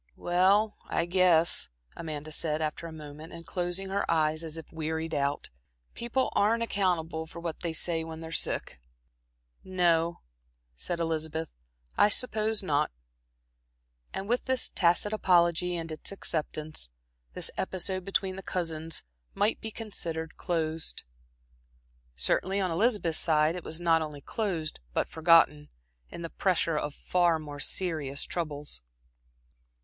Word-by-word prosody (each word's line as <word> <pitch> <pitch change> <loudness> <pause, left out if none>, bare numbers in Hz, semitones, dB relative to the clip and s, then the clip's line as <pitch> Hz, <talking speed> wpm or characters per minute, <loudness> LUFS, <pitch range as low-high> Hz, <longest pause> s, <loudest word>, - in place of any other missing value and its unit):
"Well, 195 +5 +3
I 170 - +1
guess," 175 -2 +5 0.3
Amanda 155 -2 -5
said, 155 0 +1
after 155 +1 -2
a - - -8
moment 155 0 -9
and 165 0 -9
closing 175 +2 -2
her 195 +1 0
eyes 155 0 +2
as 160 0 -4
if 160 - -9
wearied 160 0 -2
out, 140 0 -1 0.4
"people 240 +3 0
aren't 225 +3 +3
accountable 170 -7 0
for 170 - -9
what 170 -2 -4
they 170 - -2
say 165 0 -1
when 160 0 -7
they're 160 0 -7
sick." 65 - -1 0.8
"No," 170 -2 +2 0.5
said 170 - -3
Elizabeth, 160 -1 -2 0.5
"I 205 - +7
suppose 220 -2 +2
not." 150 -4 +2 1.2
And 195 - -4
with 245 +3 +1
this 260 -1 +2
tacit 175 +4 +2
apology 175 -3 +3
and 165 -1 -4
its 155 - -5
acceptance, 155 - -3 0.5
this - - +1
episode 185 0 0
between 190 0 0
the - - -5
cousins 165 -4 -2 0.3
might 210 +2 +2
be 220 - -3
considered 170 -8 -3
closed. 160 -2 -2 1.1
Certainly, 185 - +1
on 185 -3 +1
Elizabeth's 200 -3 +2
side, 155 -1 +3
it 180 - -5
was 160 - -4
not 165 -2 +4
only 150 -2 -5
closed, 175 -5 -2
but - - +1
forgotten, 160 -2 +4 0.4
in 170 - -7
the 165 - -5
pressure 175 -4 +1
of 150 -1 -2
far 175 -2 +2
more 145 -2 -7
serious 150 -5 -1
troubles. 150 - -3
165 Hz, 135 wpm, -29 LUFS, 155-185 Hz, 1.2 s, I